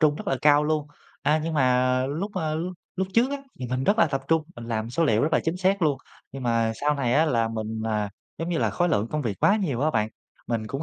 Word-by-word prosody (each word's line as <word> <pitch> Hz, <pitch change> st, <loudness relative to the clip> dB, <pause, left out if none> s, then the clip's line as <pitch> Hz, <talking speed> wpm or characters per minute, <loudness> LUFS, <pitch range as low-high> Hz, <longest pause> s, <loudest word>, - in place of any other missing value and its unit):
trung 150 Hz, -2 st, +4 dB
rất -, -, -8 dB
là 135 Hz, -, +1 dB
cao 150 Hz, 0 st, +5 dB
luôn. 155 Hz, -1 st, 0 dB, 0.4 s
A, 150 Hz, +1 st, +3 dB
nhưng 165 Hz, 0 st, -2 dB
mà 130 Hz, -1 st, +3 dB
lúc, 165 Hz, +9 st, -3 dB
ơ, 155 Hz, -4 st, -1 dB
lúc 175 Hz, +3 st, -3 dB, 0.2 s
lúc 190 Hz, 0 st, -1 dB
trước 240 Hz, +4 st, +4 dB
á 285 Hz, -, -1 dB, 0.2 s
thì 125 Hz, -, -3 dB
mình 130 Hz, +2 st, -2 dB
rất 210 Hz, +3 st, +2 dB
là 170 Hz, -, +6 dB
tập 135 Hz, -2 st, -2 dB
trung, 160 Hz, -1 st, +3 dB
mình 120 Hz, -, -8 dB
làm 115 Hz, 0 st, -3 dB
số 165 Hz, +6 st, +1 dB
liệu 110 Hz, -6 st, +3 dB
rất 155 Hz, -, +1 dB
là -, -, +4 dB
chính 165 Hz, +2 st, 0 dB
xác 190 Hz, +1 st, +1 dB
luôn. 150 Hz, -4 st, +3 dB, 0.4 s
Nhưng 135 Hz, -1 st, -6 dB
mà 115 Hz, -2 st, +1 dB
sau 150 Hz, +1 st, +2 dB
này 125 Hz, -4 st, 0 dB
á 155 Hz, -, +5 dB
là 115 Hz, -7 st, +1 dB
mình, 110 Hz, 0 st, -4 dB
ờ, 105 Hz, -2 st, 0 dB, 0.3 s
giống 165 Hz, +1 st, -3 dB
như 170 Hz, -, 0 dB
là -, -, +1 dB
khối 175 Hz, 0 st, +1 dB
lượng 110 Hz, -8 st, +1 dB
công 150 Hz, +3 st, -2 dB
việc 110 Hz, -6 st, -2 dB
quá 205 Hz, -, +5 dB
nhiều 150 Hz, -, -1 dB
á 155 Hz, +2 st, +2 dB
bạn, 110 Hz, -4 st, +1 dB, 0.4 s
mình 115 Hz, -2 st, -2 dB
cũng 135 Hz, +7 st, -4 dB
145 Hz, 275 wpm, -25 LUFS, 120-160 Hz, 0.4 s, là